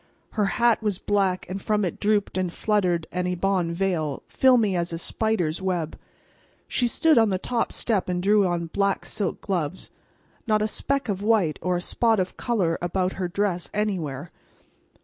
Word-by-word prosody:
Her 210 -3 +1
hat 235 -2 +3
was 210 -4 0
black, 195 -2 0
and 190 +2 -5
from 210 0 +1
it 175 - -4
drooped 210 -1 +1
and 185 -2 -1
fluttered 180 -5 0
an 180 0 -1
ebon 180 -1 0
veil, 170 -5 -1
filmy 235 -7 +3
as 170 -1 -1
a 165 - -3
spider's 180 -3 -1
web. 175 -4 -2 0.7
She 245 - +1
stood 310 +4 +4
on 225 -2 +4
the 190 - +1
top 230 +4 -1
step 210 -6 0
and 180 0 0
drew 205 0 +4
on 175 -1 -1
black 200 0 0
silk 200 -4 -2
gloves. 180 -3 -3 0.6
Not 215 -1 +2
a - - +1
speck 275 +5 -1
of 200 -2 -2
white 205 -8 +2
or 180 0 0
a 175 - -1
spot 225 +3 +1
of 185 0 -2
color 195 -9 0
about 180 +1 -1
her 185 -2 -2
dress 180 -1 -1
anywhere. 170 -8 -2
190 Hz, 175 wpm, -25 LUFS, 175-215 Hz, 0.7 s, stood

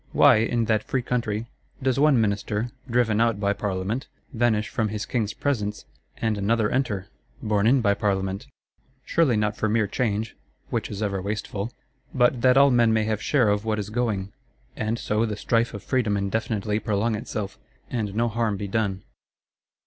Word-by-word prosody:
Why, 140 -5 +7
in 115 +1 +1
that 110 -1 +2
free 130 -2 -1
country, 115 -3 -1 0.3
does 130 0 0
one 145 -4 +5
Minister, 105 +2 -1 0.2
driven 115 -2 +2
out 115 -3 +2
by 100 0 +1
Parliament, 105 +6 -3 0.3
vanish 110 -3 +1
from 115 -4 -1
his 105 0 -4
King's 110 -4 -2
presence, 105 -8 -2 0.3
and 110 -2 -1
another 110 +1 +1
enter, 110 -8 0 0.4
borne 105 -1 +2
in 130 +2 +4
by 100 -3 +3
Parliament? 95 -2 -1 0.6
Surely 150 -9 +2
not 105 0 0
for 110 - -1
mere 110 0 +2
change 110 0 -2 0.4
(which - - -1
is 105 +1 -4
ever 100 -2 -1
wasteful); 105 +2 -3 0.4
but 120 -1 +3
that 130 +1 +5
all 140 0 +7
men 120 -2 +4
may 110 -1 +2
have 110 -1 -1
share 125 -8 +3
of 105 0 +1
what 110 -1 0
is 105 0 -4
going; 105 -4 -1 0.4
and 110 +1 -1
so 105 -1 0
the 105 -3 -2
strife 115 +1 +1
of 100 - -8
Freedom 115 -6 +1
indefinitely 105 +1 -1
prolong 110 +1 0
itself, 105 -1 -4 0.3
and 105 -4 -2
no 120 +2 +2
harm 115 -2 0
be 100 - -4
done. 100 -3 -1
110 Hz, 175 wpm, -25 LUFS, 105-120 Hz, 0.6 s, Why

